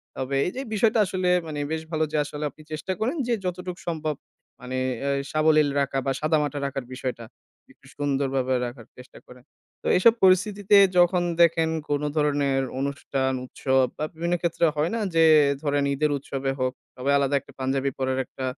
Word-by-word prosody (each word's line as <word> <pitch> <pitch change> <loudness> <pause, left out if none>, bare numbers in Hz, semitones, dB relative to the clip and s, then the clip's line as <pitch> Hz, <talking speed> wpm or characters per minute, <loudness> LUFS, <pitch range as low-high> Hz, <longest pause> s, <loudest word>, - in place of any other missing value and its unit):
তবে 135 +1 -3
এই - - 0
যে - - -4
এই - - -11
বিষয়টা 220 +1 +3
আসলে 185 -1 -1 0.2
মানে 150 -2 -5
বেশ 160 0 -2
ভালো 155 0 0
যে 155 - 0
আসলে 150 +1 -6
আপনি 155 - -17
চেষ্টা 155 +5 -4
করেন 250 +9 0
যে 240 - +1
যতটুকু 180 0 -4
সম্ভব 155 -3 -2 0.4
মানে 125 +1 -5 0.2
অ্যা 140 - -1 0.2
সাবলীল 155 -1 +3
রাখা 135 -1 -1
বা, 135 - +1
সাদামাটা 150 -2 0
রাখার 135 -2 -4
বিষয়টা। 125 -3 -5 0.5
একটু 140 - -22
সুন্দরভাবে 135 -2 0
রাখার 120 -2 -8
চেষ্টা 125 +1 -14
করেন। 125 0 -15 0.4
তো - - -5
এসব 225 +5 +6
পরিস্থিতিতে 195 +2 +4 0.2
যখন 175 0 +4 0.2
দেখেন 165 -1 +4 0.2
কোনো 145 0 0
ধরনের 145 -3 +1 0.2
অনুষ্ঠান, 135 -1 -1
উৎসব 130 0 +1
বা, 155 - -1
বিভিন্ন 170 +2 -1
ক্ষেত্রে 170 0 +1
হয় 150 +5 0
না? - - -1 0.2
যে 165 0 +6 0.4
ধরেন, 145 -1 +1
ঈদের 150 +1 0
উৎসবে 135 0 -3
হোক 130 0 0 0.2
তবে 130 +2 -3
আলাদা 140 0 +1
একটা - - -18
পাঞ্জাবি 135 +1 0
পড়ার 130 0 -1
একটা 130 - -7
145 Hz, 175 wpm, -25 LUFS, 135-170 Hz, 0.5 s, এসব